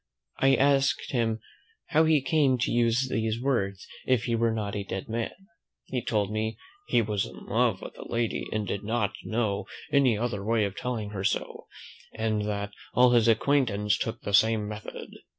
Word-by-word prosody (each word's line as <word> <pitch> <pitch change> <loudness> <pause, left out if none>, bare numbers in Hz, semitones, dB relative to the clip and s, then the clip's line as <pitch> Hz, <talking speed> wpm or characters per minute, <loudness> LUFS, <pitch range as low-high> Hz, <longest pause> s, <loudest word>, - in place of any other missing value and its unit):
I 135 0 +5
asked 140 0 +2
him, 115 -3 0 0.5
"how 160 +1 +4
he 155 -4 +3
came 140 -3 +3
to 120 - 0
use 120 +2 +2
these 110 -2 -1
words, 100 -8 -1 0.2
if 125 -3 +3
he 120 - -1
were 115 0 +2
not 105 -2 -3
a 100 - -2
dead 95 -1 -5
man?" 115 +1 -2 0.6
He 125 -2 -3
told 105 -2 0
me, 110 0 -2 0.3
"he 115 - +3
was 105 -2 -1
in - - -12
love - - +1
with - - -8
the - - -10
lady, 115 -1 -1
and 105 -1 -1
did 100 0 -3
not 110 -1 0
know 110 -3 -1 0.2
any 135 -6 +4
other 115 -3 -2
way 110 0 +2
of 100 -1 -4
telling 115 -5 -3
her 95 -2 -4
so; 100 - -2 0.5
and 110 -1 0
that 105 -1 -3 0.2
all 125 0 +6
his 120 -2 +4
acquaintance 110 -4 +2
took 115 - -3
the 100 - -4
same 110 0 +4
method." 105 +1 -7
115 Hz, 185 wpm, -27 LUFS, 105-125 Hz, 0.6 s, all